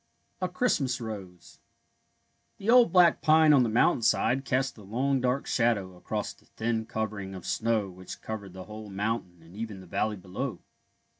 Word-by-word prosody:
A 185 - 0
CHRISTMAS 145 - 0
ROSE 100 -6 -8 1.0
The 205 +3 0
old 245 -1 +7
black 180 -2 +5
pine 155 0 +6
on 140 - +6
the 120 - +2
mountainside 120 +3 +2
cast 130 +2 0
a - - -11
long 130 +7 0
dark 125 +2 0
shadow 105 -6 +1
across 90 - -4
the - - -26
thin 110 0 -2
covering 105 -3 -4
of 90 - -9
snow 115 -3 0
which 95 0 -10
covered 100 -4 -6
the 95 0 -8
whole 105 +1 -9
mountain 100 -4 -3
and 85 +3 -16
even 110 -2 -5
the 95 - -12
valley 105 +4 -1
below. 95 +5 -5
110 Hz, 165 wpm, -28 LUFS, 95-130 Hz, 1.0 s, old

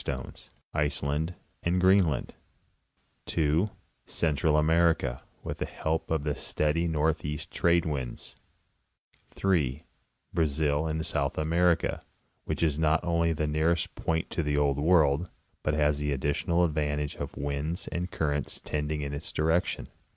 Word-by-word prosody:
225 - - -4
stones, - - -17 0.2
Iceland 75 +3 -1 0.3
and 90 +2 +1
Greenland; 95 -7 +3 0.9
(2) 80 +5 +2 0.4
Central 75 -1 +2
America, 80 -5 +3 0.2
with - - -5
the - - -2
help 80 +1 -2
of 80 -3 0
the 75 -1 0
steady 75 +4 0
northeast 75 0 -1
trade 85 0 +3
winds; 70 -6 -4 0.9
(3) 75 -7 0 0.5
Brazil, 75 -1 +1
in 80 0 -1
South 75 -4 0
America, 85 +2 +2 0.4
which - - -2
is 75 -2 +1
not 80 +1 +3
only 85 -1 +2
the 80 -1 -1
nearest 80 +3 +1
point 80 0 -2
to - - 0
the 75 -2 0
Old 70 -1 +2
World, 80 0 +3 0.3
but 75 - 0
has 75 -1 +2
the 75 0 -1
additional 75 +5 +1
advantage 75 -2 -1
of - - -6
winds 70 +5 -2
and 90 +1 -3
currents 75 -5 -1
tending 75 0 -2
in 70 0 -4
its 70 +2 -5
direction. 80 +3 0
75 Hz, 135 wpm, -29 LUFS, 75-85 Hz, 0.9 s, Greenland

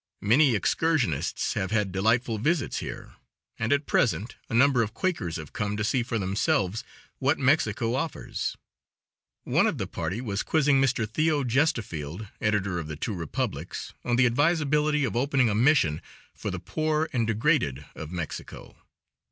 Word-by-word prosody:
Many 125 +5 +4
excursionists 105 - 0
have 95 - -2
had 105 -3 0
delightful 115 +4 +1
visits 155 +7 0
here, - - -7 0.5
and 115 +2 -1
at 145 0 +2
present 115 -1 +1
a - - -6
number 130 0 +5
of 110 0 -3
Quakers 115 - -1
have 80 -3 -7
come 105 -1 -2
to 105 - -1
see 125 +4 +1
for 115 0 -2
themselves 100 +1 0 0.4
what 140 +3 +2
Mexico 120 -5 +2
offers. 150 +5 -3 0.9
One - - +3
of - - -1
the - - -2
party 100 - -4
was 105 -5 -2
quizzing 145 -3 +3
Mr. 125 -5 +1
Theo. 150 +5 +1
Gestefeld, 110 - -1
editor 100 -4 0
of 80 - -5
the 75 - -5
Two 105 - -3
Republics, 85 -5 -4
on 120 - +1
the 125 +1 +5
advisability 150 +2 +2
of 115 -6 -1
opening 135 -2 +2
a - - 0
mission 110 - +3 0.3
for - - -5
the - - -3
poor 155 0 -1
and 115 -4 +1
degraded 110 - +1
of 80 +1 -8
Mexico. 85 -3 -6
115 Hz, 160 wpm, -27 LUFS, 100-145 Hz, 0.9 s, number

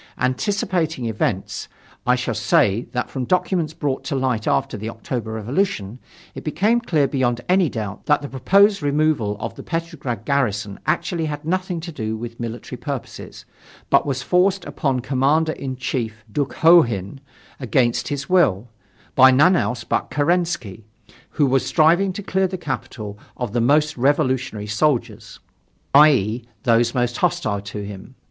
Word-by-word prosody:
Anticipating 160 - -1
events. 105 -4 -2 0.4
I - - +5
shall - - -2
say, 105 +4 +2
that 125 - -2
from 130 - -3
documents 170 -1 0
brought 145 -5 -2
to 145 - -2
light 130 -4 -1
after - - +1
the 110 +2 -5
October 115 0 -5
Revolution 110 - -2 0.3
it - - -8
became 205 +10 +1
clear 155 -11 +1
beyond 120 -2 0
any 185 -3 +3
doubt 105 -4 -6
that 150 -1 +3
the - - -4
proposed 195 - +3
removal 145 -8 +1
of - - -4
the - - -10
Petrograd 160 - -4
garrison 105 -8 -1
actually 165 -3 0
had 150 0 -5
nothing 185 +1 -1
to 170 - -7
do 110 -6 -4
with 115 +1 -8
military 120 +2 -6
purposes, 140 0 -7 0.5
but - - +4
was 135 -2 -2
forced 185 +1 +2
upon 135 -5 -1
Commander 140 +5 +1
in 135 -4 -5
Chief 115 -3 -4
Dukhonin, 135 - +3 0.4
against 120 -1 +1
his 140 -1 -4
will, 125 - +2 0.4
by 130 0 +7
none 150 +8 +5
else 125 -7 -1
but - - -1
Kerensky, 150 - -1 0.5
who 150 - +1
was 135 -1 +2
striving 165 +8 +3
to 205 +2 -6
clear 190 0 +1
the 185 +1 -5
capital 120 - -6 0.2
of 120 -4 -4
the 120 - +1
most 150 +4 +2
revolutionary 130 -5 0
soldiers, 115 -2 -1 0.5
i.e., 125 -6 +4 0.2
those 120 +1 +2
most 120 -1 0
hostile 175 - 0
to 105 0 -6
him. 100 +5 -10
130 Hz, 150 wpm, -21 LUFS, 115-160 Hz, 0.5 s, by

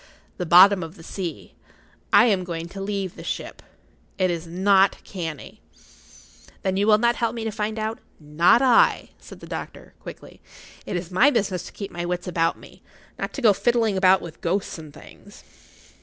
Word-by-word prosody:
"The 180 - -4
bottom 185 +3 +7
of 165 +1 -8
the 165 - -14
sea. 165 - -7 0.6
I 205 - +6
am 200 -6 +1
going 170 -2 -5
to 195 +2 -8
leave 195 -2 -4
the - - -10
ship. - - -6 0.6
It 185 -2 +1
is 170 0 -5
not 190 +3 +3
canny." 165 -7 -7 1.0
"Then 190 0 0
you 200 +2 +1
will 210 -1 +6
not 235 +2 +1
help 230 -1 -1
me 230 - -5
to 220 - -3
find 215 +1 -3
out——" 220 +1 -3 0.2
"Not 165 - +3
I," 250 -3 +3
said - - -14
the - - -9
doctor, - - -8
quickly. - - -12 0.5
"It - - -3
is 175 0 -5
my 245 +10 +5
business 200 - -2
to - - -11
keep 200 - -8
my 175 0 -5
wits 175 0 -4
about 165 -2 0
me—not - - -11
to 275 - -6
go 215 -3 +6
fiddling 230 -1 +1
about 190 0 +4
with 165 -1 -10
ghosts 180 0 -2
and 155 -2 -11
things." - - -16
190 Hz, 185 wpm, -23 LUFS, 175-215 Hz, 1.0 s, bottom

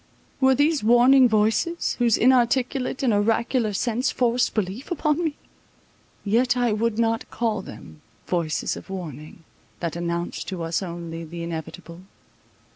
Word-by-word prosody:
Were 265 -1 +4
these 290 -1 +2
warning 245 +3 +6
voices, 220 +11 +1
whose 235 -2 +3
inarticulate 255 +1 +2
and 240 -4 +3
oracular 225 +2 +1
sense 235 +5 -1
forced 245 -1 +1
belief 210 +4 -3
upon 335 -2 0
me? 315 -3 -1 0.9
Yet 245 +5 +2
I 240 -3 +2
would 220 +1 -1
not 230 -1 0
call 220 -4 -1
them 80 - -12 0.2
Voices 170 -4 -1
of - - -11
warning, 165 -3 -8 0.4
that 170 -2 -3
announce 170 0 -3
to 185 -3 -5
us 165 +3 -1
Only 170 -2 -6
the 170 +1 -7
inevitable. 170 +1 -7
220 Hz, 135 wpm, -24 LUFS, 175-250 Hz, 0.9 s, warning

